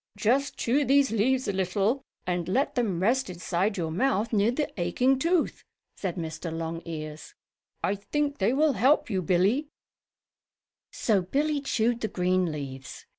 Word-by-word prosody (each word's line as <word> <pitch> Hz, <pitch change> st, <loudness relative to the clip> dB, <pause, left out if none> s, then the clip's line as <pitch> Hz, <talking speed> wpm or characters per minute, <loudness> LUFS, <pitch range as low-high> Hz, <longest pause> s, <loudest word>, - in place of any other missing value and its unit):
"Just 270 Hz, +6 st, +1 dB
chew 270 Hz, +5 st, +2 dB
these 275 Hz, 0 st, +3 dB
leaves 255 Hz, +4 st, +1 dB
a 200 Hz, -, 0 dB
little 195 Hz, +7 st, 0 dB, 0.2 s
and 175 Hz, -2 st, -1 dB
let 265 Hz, +9 st, +1 dB
them 205 Hz, -8 st, 0 dB
rest 250 Hz, +2 st, +2 dB
inside 180 Hz, +3 st, -1 dB
your 165 Hz, -3 st, -2 dB
mouth 225 Hz, +3 st, 0 dB
near 210 Hz, +1 st, +3 dB
the 290 Hz, +5 st, 0 dB
aching 250 Hz, +10 st, +2 dB
tooth," 335 Hz, +3 st, +1 dB, 0.3 s
said 185 Hz, -4 st, -3 dB
Mr. 160 Hz, 0 st, -5 dB
Longears. 160 Hz, -2 st, -6 dB, 0.5 s
"I 195 Hz, -, +2 dB
think 285 Hz, +8 st, -2 dB
they 195 Hz, +4 st, +3 dB
will 295 Hz, +2 st, +3 dB
help 255 Hz, +3 st, +3 dB
you, 190 Hz, -2 st, 0 dB
Billie." 190 Hz, -, +2 dB, 1.2 s
So 210 Hz, -5 st, +1 dB
Billie 285 Hz, +10 st, 0 dB
chewed 240 Hz, -3 st, 0 dB
the 220 Hz, -, 0 dB
green 185 Hz, -2 st, +1 dB
leaves. 135 Hz, -3 st, -7 dB
205 Hz, 150 wpm, -27 LUFS, 175-265 Hz, 1.2 s, these